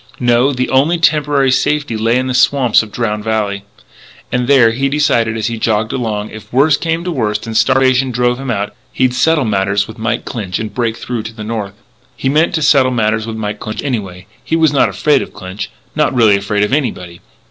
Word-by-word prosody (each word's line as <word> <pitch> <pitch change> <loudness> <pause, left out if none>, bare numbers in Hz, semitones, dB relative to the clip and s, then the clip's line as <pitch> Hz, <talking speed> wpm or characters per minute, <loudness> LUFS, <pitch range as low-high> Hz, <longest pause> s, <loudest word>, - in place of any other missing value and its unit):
No, 120 +2 +3
the 130 -1 -1
only 145 +6 +3
temporary 145 -4 +2
safety 150 -1 0
lay 115 +2 +1
in 130 - 0
the 130 - -2
swamps 125 -1 +3
of 110 -2 -9
Drowned 105 -2 -2
Valley. 105 -2 -2 0.7
And 125 -1 0
there, 130 -5 +5
he 135 +4 -1
decided 120 -6 +1
as 110 - -2
he 115 0 -3
jogged 110 0 0
along, 110 -4 -3
if 110 - -11
worse 140 +4 +4
came 165 +1 -2
to 180 - -3
worst 105 -8 -2
and 115 -1 -6
starvation 130 +2 +3
drove 125 0 0
him 135 -1 -5
out, 105 -3 -2 0.2
he'd 130 -1 +1
settle 150 +3 +2
matters 100 -1 0
with 110 0 -11
Mike 115 +1 -2
Clinch 95 -6 -4
and 110 -1 -5
break 115 -2 -1
through 120 -2 -4
to 110 +1 -8
the 110 -1 -8
north. 105 -3 -4 0.4
He 135 - -1
meant 155 +4 +2
to 160 - 0
settle 135 -3 +4
matters 110 -2 0
with 115 - -5
Mike 105 -1 -4
Clinch 110 0 -5
anyway. 95 -9 -4 0.2
He 160 - -1
was 160 -3 +3
not 140 - +3
afraid 150 -3 +2
of - - -8
Clinch; 95 +1 -6 0.3
not - - +1
really 110 -4 +5
afraid 100 +1 -1
of 105 - -1
anybody. 90 - -2
120 Hz, 215 wpm, -15 LUFS, 110-135 Hz, 0.7 s, there